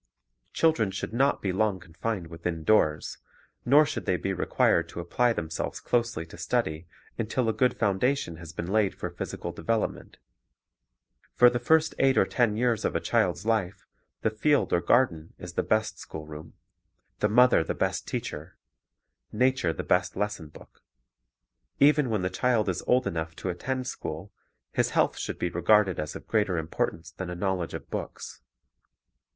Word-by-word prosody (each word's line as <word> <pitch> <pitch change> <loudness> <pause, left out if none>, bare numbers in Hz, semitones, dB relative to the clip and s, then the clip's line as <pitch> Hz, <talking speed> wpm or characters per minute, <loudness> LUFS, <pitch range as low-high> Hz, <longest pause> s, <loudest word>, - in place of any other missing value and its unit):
Children 160 -11 +2
should 95 - -5
not 135 +4 +2
be 95 -2 0
long 100 -1 +1
confined 90 +3 -4
within 85 0 -5
doors, 75 -7 +2 0.5
nor 145 +5 +6
should - - -5
they 90 - +2
be 95 - -2
required 85 -2 +2
to 85 - -7
apply 120 +8 +1
themselves 80 -7 -3
closely 115 -9 -1
to 80 - -13
study 80 +2 -1 0.3
until 115 +2 0
a 110 - +2
good 125 +1 +1
foundation 105 - 0
has 80 -1 -9
been 85 - -5
laid 100 +1 +1
for - - -5
phys - - -5
ical - - -6
development. 115 -1 -2 1.2
For 125 0 +7
the 120 - -1
first 160 +6 +3
eight 135 -1 +4
or - - +5
ten 115 -4 +1
years 115 -2 +1
of - - -1
a - - +2
child's 100 - 0
life 110 -5 -1 0.4
the 110 - +1
field 145 +7 +1
or 85 - +3
garden 85 -12 +1
is 90 -1 -9
the - - +1
best 110 0 0
schoolroom, 75 0 -9 0.6
the 105 - +2
mother 125 -5 +5
the - - -3
best - - -1
teacher, 75 +4 -5 0.7
nature 125 -5 +2
the - - -5
best - - +1
lesson 105 -5 -3
book. 75 - -17 1.0
Even 145 -2 +5
when 105 -4 0
the 90 - 0
child 115 +1 +1
is 90 - -2
old 125 0 +3
enough 80 -1 -3
to 95 - -4
attend 130 +9 -3
school, 90 -5 -6 0.4
his - - +1
health - - +3
should - - -4
be 90 - -1
regarded 95 +2 +3
as 75 - -4
of - - -9
greater 105 -5 +1
importance 80 +1 -3
than 90 +2 -6
a 90 - -4
knowledge 95 -2 -2
of - - -9
books. - - -6
100 Hz, 170 wpm, -27 LUFS, 85-120 Hz, 1.2 s, For